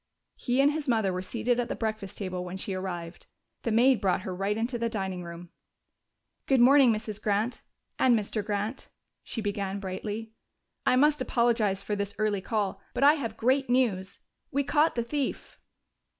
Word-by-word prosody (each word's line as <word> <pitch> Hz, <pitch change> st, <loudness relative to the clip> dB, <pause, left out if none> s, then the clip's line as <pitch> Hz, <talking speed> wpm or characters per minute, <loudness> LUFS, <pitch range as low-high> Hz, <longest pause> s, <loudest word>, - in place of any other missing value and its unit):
He 250 Hz, +1 st, -1 dB
and 285 Hz, +1 st, +5 dB
his 305 Hz, -1 st, -4 dB
mother 220 Hz, -6 st, +2 dB
were 180 Hz, -, -2 dB
seated 240 Hz, +5 st, -1 dB
at 240 Hz, -, 0 dB
the -, -, -3 dB
breakfast 215 Hz, -4 st, -4 dB
table 185 Hz, -3 st, -3 dB
when 180 Hz, +1 st, -6 dB
she 190 Hz, +1 st, -4 dB
arrived. 180 Hz, -2 st, -5 dB, 0.3 s
The 230 Hz, -, -1 dB
maid 245 Hz, +3 st, +4 dB
brought 190 Hz, -2 st, +1 dB
her 185 Hz, -, -4 dB
right 200 Hz, +3 st, -1 dB
into 235 Hz, +2 st, -2 dB
the 230 Hz, 0 st, 0 dB
dining 190 Hz, -5 st, -3 dB
room. 170 Hz, 0 st, -9 dB, 1.0 s
"Good 265 Hz, -2 st, +4 dB
morning, 260 Hz, 0 st, +7 dB
Mrs. 215 Hz, -1 st, -4 dB
Grant 210 Hz, +4 st, 0 dB, 0.4 s
and 245 Hz, -3 st, +5 dB
Mr. 215 Hz, 0 st, -2 dB
Grant," 210 Hz, +5 st, -3 dB, 0.3 s
she 225 Hz, -, -5 dB
began 200 Hz, -1 st, -2 dB
brightly. 210 Hz, +3 st, -5 dB, 0.5 s
"I -, -, +5 dB
must 295 Hz, +2 st, +4 dB
apologize 230 Hz, -6 st, +1 dB
for 210 Hz, -, -2 dB
this 200 Hz, 0 st, -3 dB
early 210 Hz, -2 st, 0 dB
call, 205 Hz, -1 st, -2 dB
but -, -, +1 dB
I 290 Hz, +1 st, +8 dB
have 230 Hz, -8 st, -4 dB
great 260 Hz, +3 st, +2 dB
news. 205 Hz, -7 st, 0 dB, 0.3 s
We 280 Hz, +1 st, 0 dB
caught 300 Hz, +3 st, +2 dB
the 235 Hz, -, 0 dB
thief!" 280 Hz, +3 st, -3 dB
220 Hz, 180 wpm, -28 LUFS, 195-245 Hz, 1.0 s, I